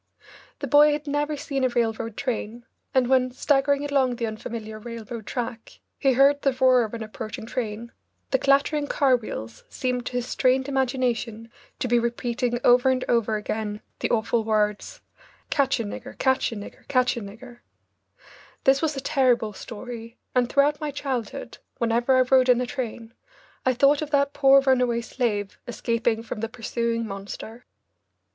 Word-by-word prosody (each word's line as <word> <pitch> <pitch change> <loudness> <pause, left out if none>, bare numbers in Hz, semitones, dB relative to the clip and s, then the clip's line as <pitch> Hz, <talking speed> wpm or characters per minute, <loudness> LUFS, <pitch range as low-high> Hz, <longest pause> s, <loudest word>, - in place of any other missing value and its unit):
The - - -4
boy 295 0 +6
had 295 0 -4
never 295 +1 -1
seen 280 -2 -3
a 255 - +3
railroad 230 -2 -1
train, 235 -2 -3 0.3
and 260 -1 +3
when, 255 -1 +3
staggering 280 +2 +1
along 270 -3 +1
the 235 - -2
unfamiliar 220 0 -6
railroad 230 -1 -8
track, 235 -2 -5 0.2
he 270 -2 +3
heard 280 +3 +4
the 275 - +2
roar 255 -2 +5
of 220 +1 -5
an 225 - -5
approaching 215 0 -7
train, 235 -1 -4 0.4
the 265 - +3
clattering 285 +2 +2
car 270 -3 +3
wheels 115 - -6
seemed 250 -2 -2
to - - -6
his 245 -1 -1
strained 260 +2 +1
imagination 245 -4 -1 0.3
to 255 - -2
be 240 0 +3
repeating 240 +1 -1
over 245 +2 +5
and 255 -1 +1
over 225 -2 +2
again 210 0 -3 0.2
the - - -1
awful 230 0 +1
words, 215 - -1 0.5
"Catch 275 -3 +2
a - - -1
nigger 250 +5 -8
catch 260 -2 +1
a - - -5
nigger 205 -1 -10
catch 255 -2 +2
a 235 - -4
nigger 235 +4 -11 0.5
" - - -24
This 270 +1 +4
was 310 -3 -1
a - - -3
terrible 245 -6 +2
story, 230 +2 -8 0.2
and 245 -1 +2
throughout 290 +2 +2
my 300 - -2
childhood, 270 -4 -4 0.2
whenever 235 +3 +2
I - - +6
rode 255 0 +4
in 245 -1 +5
a 250 - 0
train, 235 -3 -5 0.5
I 255 - +3
thought 280 +4 +4
of 305 - -3
that 280 -1 +2
poor 275 -1 +6
runaway 250 -3 +2
slave 220 -5 -2
escaping 230 -1 -1
from 225 - -6
the 225 +1 -3
pursuing 230 0 -2
monster. 205 +4 -8
245 Hz, 170 wpm, -25 LUFS, 230-270 Hz, 0.5 s, boy